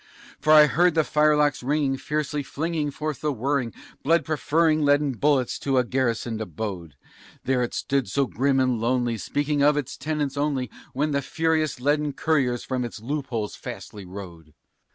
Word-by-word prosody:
For 155 - +2
I 155 -1 +9
heard 175 +2 +3
the 160 - +4
firelocks 150 -2 +2
ringing 140 +1 0
fiercely 150 +1 -2
flinging 155 +2 -2
forth 150 0 -4
the 150 - 0
whirring, 135 -1 -1 0.3
Blood 165 +1 +2
preferring 155 0 +2
leaden 145 0 +3
bullets 135 0 +1
from 135 -1 -1
a 125 - +4
garrisoned 120 -3 -1
abode; 90 -5 -5 0.5
There 130 -1 +1
it 120 - -2
stood 135 -7 -1
so 140 +8 +1
grim 135 +2 +1
and 130 -3 +1
lonely, 120 -1 0
speaking 145 +5 -1
of 150 +1 +4
its 145 -4 -3
tenants 150 -3 -2
only, 140 -5 -1 0.2
When 150 +3 0
the 140 -1 +1
furious 160 -3 0
leaden 145 +2 +1
couriers 135 -7 0
from 130 -1 -2
its 120 -2 -6
loopholes 120 -3 -3
fastly 105 -2 -8
rode. 90 -5 -10
140 Hz, 165 wpm, -25 LUFS, 120-150 Hz, 0.5 s, I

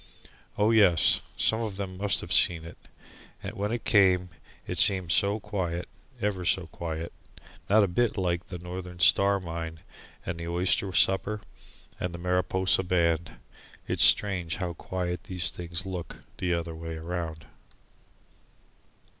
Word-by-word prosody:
Oh 105 +2 +3
yes; 90 -9 +5 0.2
some 110 +1 +2
of 105 -4 -4
them 95 -2 -5
must 100 -1 +1
have - - -3
seen 85 -2 +4
it. 85 - -10 0.7
And - - -4
yet - - -15
when 105 +2 -2
it 120 0 -3
came 95 -4 +4 0.4
it - - -2
seemed 95 -5 +3
so 100 +3 +2
quiet, 90 -5 -3 0.3
ever 100 -3 -1
so 90 +1 +1
quiet, 80 0 -6 0.6
not 105 +1 +6
a - - +3
bit 110 +6 0
like 90 -2 -1
the 90 - -6
Northern 90 +1 -7
Star 100 +3 +4
mine 80 -2 -6 0.4
and 85 -1 -4
the 85 - -5
oyster 90 +3 +1
supper 95 +3 +2 0.6
and 90 -1 -3
the - - -6
Mariposa 90 +1 +1
band. 85 -2 0 0.5
It - - -2
is - - +4
strange 95 -5 +3
how 90 -3 -3
quiet 90 0 -4
these 90 -2 -2
things 85 +2 -4
look, 90 -3 -6 0.2
the 90 - -1
other 85 -1 -2
way 80 0 -6
round. 80 -1 -5
90 Hz, 155 wpm, -27 LUFS, 85-100 Hz, 0.7 s, not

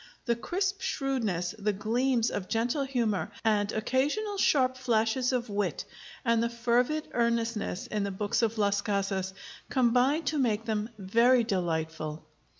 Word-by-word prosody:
The 235 -2 +2
crisp 385 - -2
shrewdness, 245 - -1
the 210 0 0
gleams 235 +4 +1
of 185 -2 -3
gentle 245 +5 0
humor 235 -7 0 0.2
and 210 -1 +2
occasional 295 - 0
sharp 255 -6 +3
flashes 245 0 +1
of 245 -2 -1
wit, 205 -1 -2 0.4
and 230 -1 +3
the 235 - +1
fervid 245 +6 0
earnestness, 230 -4 -1
in 210 -1 -2
the 200 - -1
books 205 +3 -1
of 230 -1 0
Las 205 -1 +2
Casas, 195 -2 -1 0.4
combine 255 +5 +3
to 300 0 -1
make 225 -4 +1
them 215 -1 -1
very 230 +6 +4
delightful. 160 -6 -2
230 Hz, 145 wpm, -29 LUFS, 205-255 Hz, 0.4 s, very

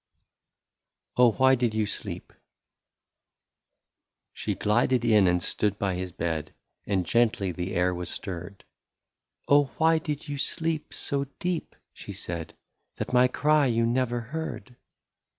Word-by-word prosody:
lOI 125 - +6
OH, - - +4
WHY 130 +2 +5
DID 120 -4 +1
YOU 110 -1 +2
SLEEP? - - -6 2.0
She - - -3
glided 120 +3 +2
in, 105 -4 +5
and 90 0 +2
stood 105 -1 0
by 100 -2 0
his 90 0 -4
bed. 80 -3 -3 0.3
And 95 -3 +1
gently 110 -2 +2
the 90 +2 -4
air 90 +1 +2
was 90 0 -5
stirred: 95 0 -6 0.4
" - - -51
Oh, 145 0 +6
why 160 0 +4
did 150 -2 -4
you 145 -1 -4
sleep 160 +1 -1
so 140 0 -1
deep,*' 180 -2 -3 0.2
she - - -8
said, 85 -2 -5 0.4
That - - -5
my 125 0 +6
cry 150 +2 +3
you 115 -1 +2
never 120 0 +1
heard 130 -1 -6
115 Hz, 140 wpm, -27 LUFS, 95-140 Hz, 2.0 s, lOI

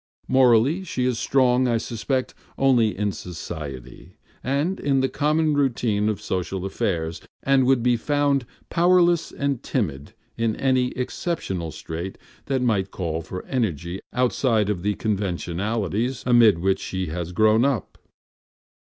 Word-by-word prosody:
Morally, 130 +6 +4
she 130 -8 -2
is 125 -2 0
strong, 130 -1 +3
I 120 -1 +2
suspect, 125 +3 -2 0.2
only 120 -6 +3
in 105 0 0
society, 75 -8 -8 0.3
and 145 +9 0
in 135 -2 +1
the 130 - +2
common 155 +1 +1
routine 120 -7 +1
of 105 - -2
social 95 0 -3
affairs, 85 -4 -2 0.2
and 135 -2 +3
would 130 -3 +3
be 120 -1 +3
found 140 -1 +1 0.2
powerless 175 -1 +3
and 140 -3 -2
timid 75 - -3 0.2
in 115 -1 +1
any 130 -2 +2
exceptional 125 - -3
strait 85 +4 -6 0.3
that 130 -2 0
might 100 -5 +1
call 85 -4 -3
for 90 +3 -7
energy 90 - -2
outside 120 -4 +1
of 90 -4 -3
the 105 +2 0
conventionalities 105 +3 -2
amid 120 -6 +6
which 95 +3 +1
she 95 0 -3
has 85 +2 -4
grown 110 +5 +4
up. 135 -6 -1
115 Hz, 135 wpm, -23 LUFS, 95-135 Hz, 0.3 s, amid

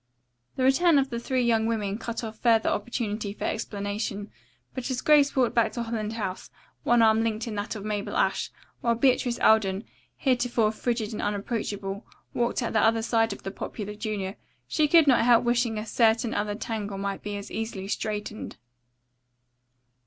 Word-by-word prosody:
The 260 - -1
return 300 +5 +5
of 275 -1 +1
the 235 - -2
three 255 +1 0
young 225 -2 +2
women 210 -2 -1
cut 235 0 -4
off 220 -1 -7
further 225 -2 +3
opportunity 210 -2 -2
for - - -8
explanation, 205 -1 -3 0.4
but 255 0 -4
as 255 -1 -1
Grace 290 0 +4
walked 255 -3 +2
back 230 -2 +2
to 240 - -2
Holland 225 -2 -3
House, 200 -5 -4 0.3
one 240 -1 +4
arm 220 0 +5
linked 220 -1 -1
in 225 - -4
that 205 +2 -3
of 205 -1 -7
Mabel 210 -1 -2
Ashe, - - +1 0.3
while 235 -4 +1
Beatrice 245 -1 +2
Alden, 200 -2 +3 0.3
heretofore 245 -5 +1
frigid 230 -1 -2
and - - -4
unapproachable, 205 -1 -3 0.3
walked 240 +1 0
at 235 - -2
the 220 - +3
other 225 +1 +3
side 225 -1 +2
of 200 - -8
the 195 - -4
popular 210 +1 -6
junior, 210 -2 -4 0.3
she 305 -1 +2
could 325 +1 +6
not 255 -5 +4
help 235 -1 +5
wishing 240 -2 +1
a 215 - -3
certain 225 +1 +2
other 205 0 -1
tangle 210 -2 -4
might 195 0 -3
be 205 -1 -4
as 200 - -8
easily 220 -4 -4
straightened. 210 +1 -4
225 Hz, 175 wpm, -26 LUFS, 210-240 Hz, 0.4 s, could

